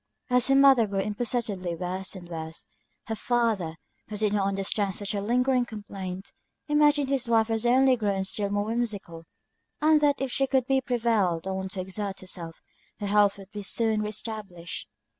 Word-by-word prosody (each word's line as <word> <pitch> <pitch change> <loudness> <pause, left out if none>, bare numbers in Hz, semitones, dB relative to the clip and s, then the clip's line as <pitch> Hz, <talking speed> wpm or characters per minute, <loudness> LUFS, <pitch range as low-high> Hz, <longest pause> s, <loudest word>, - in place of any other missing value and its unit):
As 250 0 +4
her 270 - +4
mother 270 -5 +6
grew 195 -1 -1
imperceptibly 210 -4 -2
worse 185 +3 -3
and 180 -2 -9
worse, 160 -1 -6 0.4
her 225 - -3
father, 220 -9 0 0.3
who 210 - -6
did 210 -1 +1
not 200 -2 +1
understand 195 0 0
such 205 0 -3
a 200 - -1
lingering 250 +4 +2
complaint, 195 -4 -7 0.3
imagined 295 -1 +4
his 265 -3 0
wife 225 -1 +3
was 225 +1 +1
only 260 +1 +5
grown 200 -4 0
still 200 +1 -2
more 205 0 0
whimsical, 210 -8 -3 0.5
and 305 0 +4
that 290 -1 +4
if 270 -2 -2
she 270 +2 +1
could 265 -2 +2
be 270 0 +2
prevailed 220 -9 +1
on 190 0 -3
to 190 0 -4
exert 195 +1 -4
herself, 170 -3 -6 0.4
her 205 - -3
health 205 0 +3
would 200 +1 -9
soon 220 +1 +1
be 210 - -1
re - - -2
established. 210 -5 -6
210 Hz, 180 wpm, -27 LUFS, 190-240 Hz, 0.5 s, mother